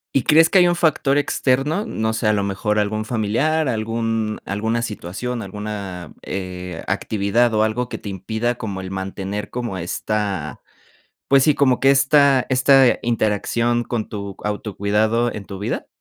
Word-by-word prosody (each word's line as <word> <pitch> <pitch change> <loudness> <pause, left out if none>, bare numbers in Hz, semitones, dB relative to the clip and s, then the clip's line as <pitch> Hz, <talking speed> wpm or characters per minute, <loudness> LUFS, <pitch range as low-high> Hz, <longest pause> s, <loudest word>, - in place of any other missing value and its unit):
¿Y 130 - +3
crees 160 +1 +5
que 190 - +6
hay 175 - +6
un 175 - +2
factor 150 -4 +2
externo?, 145 +6 +1
no 110 0 -1
sé, 110 -1 -1
a 105 - +4
lo 100 -1 0
mejor 105 +2 -1
algún 110 +1 0
familiar, 125 +8 0
algún 115 -1 -1
alguna 110 +4 -1
situación, 115 +4 -4
alguna, 100 -4 -6
eh, 90 -2 -6
actividad 110 +3 +1
o 110 - +3
algo 120 +3 -1
que - - -5
te 100 - -8
impida 110 +6 -2
como 100 -5 -5
el 95 - -7
mantener 95 +2 -4
como 120 -5 -4
esta, 100 +3 -3 0.7
pues, 135 -1 +5
sí, 150 - +4
como 130 -3 +3
que 135 - +4
esta 140 -1 +4
esta 130 0 +5
interacción 115 +1 0
con 115 -3 -3
tu 100 -2 -6
autocuidado 105 +3 0
en 105 - -7
tu 100 -1 -8
vida. 100 - -3
110 Hz, 160 wpm, -21 LUFS, 100-125 Hz, 0.7 s, que